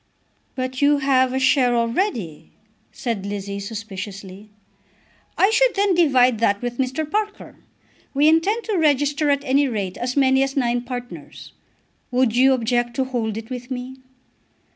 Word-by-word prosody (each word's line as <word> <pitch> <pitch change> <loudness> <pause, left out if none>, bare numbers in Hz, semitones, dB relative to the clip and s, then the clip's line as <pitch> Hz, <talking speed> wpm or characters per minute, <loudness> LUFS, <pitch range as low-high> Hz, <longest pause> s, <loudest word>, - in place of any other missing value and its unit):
"But 255 +1 -4
you 290 +1 +4
have 260 -2 +2
a 260 - -2
share 260 -2 +3
already," 230 - -2 0.4
said 230 -6 -4
Lizzie 200 0 -5
suspiciously. 200 -1 -8 0.9
"I 390 - +4
should - - +3
then 400 -1 +2
divide 255 -9 +3
that 205 -3 +2
with 245 0 -4
Mr. 265 +4 -1
Parker. 420 +5 -4 0.6
We 290 +2 +4
intend 385 +9 +2
to 420 -5 -1
register 290 -1 +2
at 280 0 +1
any 280 +1 +2
rate 200 -7 -4
as 245 +3 -3
many 265 -1 +4
as 270 +1 -1
nine 240 -2 +1
partners. 245 0 -8 0.6
Would 250 -2 +1
you 265 +2 +5
object 240 -1 -1
to 265 - +1
hold 235 -5 -3
it 225 +2 -8
with 250 0 -6
me?" 255 0 -6
255 Hz, 150 wpm, -21 LUFS, 230-285 Hz, 0.9 s, you